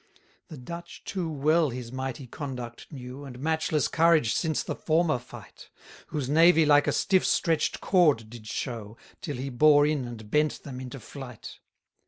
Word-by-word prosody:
121 160 - -9
The 125 - -13
Dutch 170 +3 -8
too 180 -4 -3
well 155 +2 +2
his 120 -1 -7
mighty 130 0 -5
conduct 125 -2 -7
knew, 130 0 -8
And 130 -3 -9
matchless 155 0 0
courage 160 -8 +3
since 160 -2 0
the - - -3
former 160 -4 +1
fight; 125 - -13 0.4
Whose 145 -4 -3
navy 165 +2 +5
like 145 -1 +5
a - - +3
stiff 190 -2 +2
stretch'd 165 -4 +1
cord 150 - +3
did 110 -1 -11
show, 115 -2 -5 0.2
Till 150 -5 -4
he 135 +2 -4
bore 145 +3 +5
in 150 -4 0
and 110 -3 -9
bent 150 0 +1
them 130 -3 -7
into 130 +1 -7
flight. 125 -1 -10
145 Hz, 170 wpm, -27 LUFS, 125-160 Hz, 0.4 s, navy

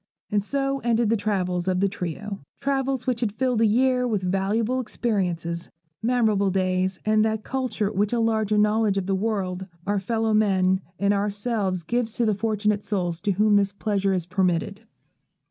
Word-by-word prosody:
And 205 -1 +1
so 275 +3 -1
ended 235 -2 +1
the - - +4
travels 185 -4 -1
of 185 -1 +1
the 200 - +3
trio, 195 +2 -5 0.2
travels 270 -2 -1
which 250 -3 0
had 225 -4 +1
filled 250 -2 +1
a 225 - +5
year 250 +3 +2
with 210 -5 -1
valuable 205 +7 0
experiences, 180 -8 -2 0.3
memorable 220 -4 +2
days, 185 0 0
and 215 0 +3
that 220 -1 -1
culture 245 -6 -2
which 205 0 0
a 240 - +1
larger 220 -2 +1
knowledge 210 -1 +2
of 195 - -1
the 195 - 0
world, 190 -2 -2 0.2
our 205 0 +1
fellow 220 +2 0
men, 190 -3 +3 0.2
and 200 0 +2
ourselves 205 -2 -1
gives 235 +3 -1
to 235 - 0
the 215 - +2
fortunate 210 0 0
souls 175 -5 -2
to 205 -1 +1
whom 210 +2 +4
this 200 0 +1
pleasure 200 -1 0
is 180 -3 -2
permitted. 185 +2 0
210 Hz, 175 wpm, -24 LUFS, 190-225 Hz, 0.3 s, a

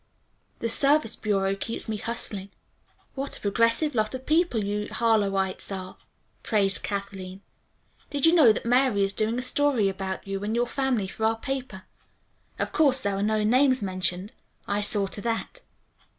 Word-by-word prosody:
"The 230 - 0
Service 275 0 +3
Bureau 195 -2 0
keeps 225 +4 -5
me 220 -1 -2
hustling." 210 -3 -2 0.6
"What 275 0 -4
a - - -13
progressive 230 +8 +2
lot 215 +1 0
of 260 0 -8
people 310 - +2
you 205 +1 -2
Harlowites 200 -5 0
are," 185 -1 -6 0.5
praised 200 -2 +1
Kathleen. 195 -2 -5 0.7
"Did 285 0 +1
you 325 - +6
know 300 -10 +7
that 215 - -3
Mary 245 -4 +3
is 195 0 0
doing 220 +3 -1
a 250 - -2
story 260 -5 +2
about 190 0 -5
you 195 0 -4
and 215 +2 -2
your 240 +1 +2
family 245 -5 -1
for 220 - -7
our 225 0 +2
paper. 260 -6 -5 0.7
Of - - -2
course 275 -4 +3
there 200 -5 -1
are 195 - -2
no 215 +1 +1
names 255 +2 +3
mentioned. 185 +1 -1 0.4
I 200 +1 0
saw 205 -1 +1
to 200 +1 -6
that." 235 - -3
215 Hz, 165 wpm, -26 LUFS, 195-255 Hz, 0.7 s, know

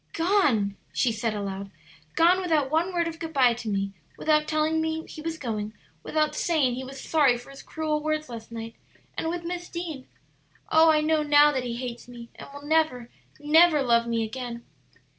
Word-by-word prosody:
"Gone!" 295 - +2
she 245 - +1
said 220 0 -2
aloud; 195 -1 -5 0.5
"gone 355 +3 +4
without 310 -6 +1
one 330 +4 +1
word 340 -2 0
of 330 0 -6
good 325 -1 -6
by 255 -4 +4
to 230 -1 -6
me, 195 -1 -1 0.3
without 305 -1 +2
telling 310 +1 +1
me 320 0 -2
he 310 - -10
was 325 0 -4
going, 215 -5 -4 0.3
without 305 - 0
saying 300 -6 +1
he 255 +2 -5
was 270 +1 -9
sorry 280 -6 +3
for 245 +3 -13
his 275 - -11
cruel 310 -1 -2
words 310 0 -2
last 230 -2 -9
night, 230 0 -7 0.4
and 325 - -2
with 345 0 -4
Miss 350 +1 -5
Deane. 325 -7 -6 0.6
Oh, 320 +1 +6
I 305 -1 +4
know 310 0 +2
now 295 0 +5
that 260 -3 -2
he 235 -1 -3
hates 240 -1 -6
me 240 -1 -11
and - - -11
will 285 0 -10
never, 295 -6 0 0.3
never 305 0 +5
love 235 -2 +3
me 230 -1 0
again!" 235 +1 -6
295 Hz, 195 wpm, -26 LUFS, 235-320 Hz, 0.6 s, Oh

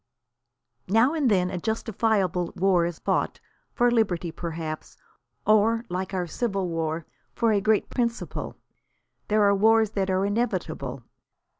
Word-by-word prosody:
Now 225 - +4
and 300 -6 +2
then 185 -3 +2
a 185 - -3
justifiable 210 -4 0
war 180 -2 +3
is 170 -2 -6
fought, - - -1 0.3
for 245 0 +2
liberty 185 -8 +1
perhaps, 160 -2 -6 0.5
or 220 +2 +3
like 185 +2 -3
our 185 -2 -1
Civil 195 0 -2
War, 165 -1 -2 0.3
for 230 -1 +2
a 205 -2 +2
great 215 +1 +2
principle. 235 -1 -2 0.7
There 215 0 +3
are 200 0 +5
wars 220 +1 +4
that 195 -2 -1
are 190 +1 +1
inevitable. 200 - -2
195 Hz, 135 wpm, -26 LUFS, 175-225 Hz, 0.7 s, are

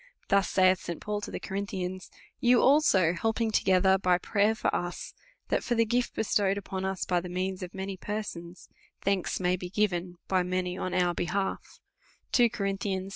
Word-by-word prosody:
Thus, 200 -1 +3
saith 185 -1 +4
St. 170 - -6
Paul 210 0 -3
to - - -6
the - - -5
Co 190 - -8
rinthians, 185 -2 -4 0.3
You 245 0 +5
also 205 - +4
helping 225 +4 0
together 190 -1 +3
by 180 -1 +3
prayer 205 +4 +1
for - - -1
US, 175 0 -4 0.4
that - - +1
for 240 - 0
the 230 0 +3
gift 240 +2 0
bestowed 200 -2 +1
upon 190 -1 -3
ns 190 - -4
by 180 -1 +1
the 180 - -7
means 185 +1 -3
of 180 0 -7
many 190 0 -4
persons, 185 -4 -6 0.4
thanks 195 -2 0
may 180 0 +2
be 180 0 -6
given 180 -3 -1
by 185 -1 +2
many 180 0 -2
on 185 -1 -3
our 180 -1 +2
behalf, 190 +3 -3 0.5
2 240 -2 +5
Cowl 200 - -3 0.2
11. 190 -1 -2
190 Hz, 185 wpm, -28 LUFS, 180-205 Hz, 0.5 s, You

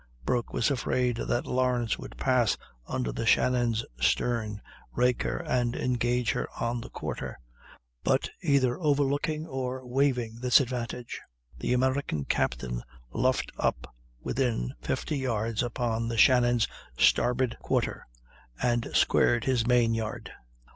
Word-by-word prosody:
Broke 120 -1 0
was 120 - +1
afraid 125 -2 0
that 120 - -1
Lawrence 125 -2 0
would - - -9
pass 125 -4 +2 0.3
under - - -2
the - - -3
Shannon's 120 -3 +3
stern, 110 - +1 0.3
rake 125 0 +2
her, - - -1
and 120 -1 0
engage 125 -2 +1
her - - -2
on 115 0 -1
the - - -9
quarter; - - -5 0.7
but - - +2
either 140 -6 +2
overlooking 145 0 +1
or 130 -3 -4
waiving 125 -3 0
this 125 0 +5
advantage, 125 -2 -4 0.3
the 65 - -1
American 130 - 0
captain - - -1 0.3
luffed 130 +2 +1
up - - -1 0.3
within 115 - -1
50 150 - -2
yards 115 -4 -1
upon 115 -1 -1
the 115 0 -3
Shannon's 120 -1 +5 0.3
starboard 125 0 +3
quarter, - - -1 0.5
and 120 -1 +1
squared 120 -1 +3
his 125 -3 +1
main 120 -2 +4
yard. 110 -1 -4
120 Hz, 125 wpm, -28 LUFS, 115-130 Hz, 0.7 s, this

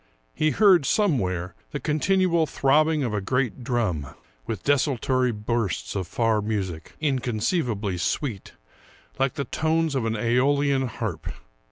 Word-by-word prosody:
He 155 - +1
heard, 185 -5 +5
somewhere, 95 - +1 0.2
the 145 - -4
continual 170 +2 +2
throbbing 150 +3 +2
of 120 -4 -2
a 105 - -1
great 125 +3 -1
drum, 110 - -1 0.4
with 110 -6 -4
desultory 130 -3 +1
bursts 105 -4 -2
of 95 -3 -2
far 115 +1 +1
music, 95 -7 -4
inconceiv 130 - 0
ably 100 -4 -3
sweet, 110 - -2 0.7
like 135 -1 +1
the 140 - -2
tones 160 +3 0
of 130 -4 -1
an 110 - 0
seolian 130 +4 +2
harp. 115 - -5
125 Hz, 135 wpm, -25 LUFS, 105-150 Hz, 0.7 s, heard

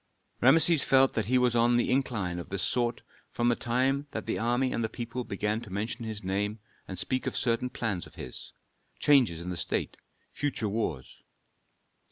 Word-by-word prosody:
Rameses 155 +3 +6
felt 135 0 +4
that 110 -3 -1
he 130 +2 +3
was 125 -1 +2
on 120 +1 +4
an 120 - +4
incline 115 -9 0
of 85 - -8
this 100 -1 -2
sort 120 +2 0 0.3
from 120 0 0
the 120 - +3
time 130 +5 0
that 110 - -5
the - - -2
army 120 +3 +1
and 115 - -1
the 110 - -1
people 120 +2 -5
began 105 +1 -2
to 115 - -10
mention 110 +5 -3
his 110 -2 -5
name 100 +3 -1 0.3
and 95 - -6
speak 130 +8 -1
of - - -2
certain 120 +1 +1
plans 105 -8 -2
of - - -18
his, 65 - -8 0.5
changes 125 - +4
in 90 - -4
the 90 - -4
state, - - -2 0.3
future 135 -6 -2
wars. 85 - -3
115 Hz, 190 wpm, -29 LUFS, 100-125 Hz, 0.5 s, Rameses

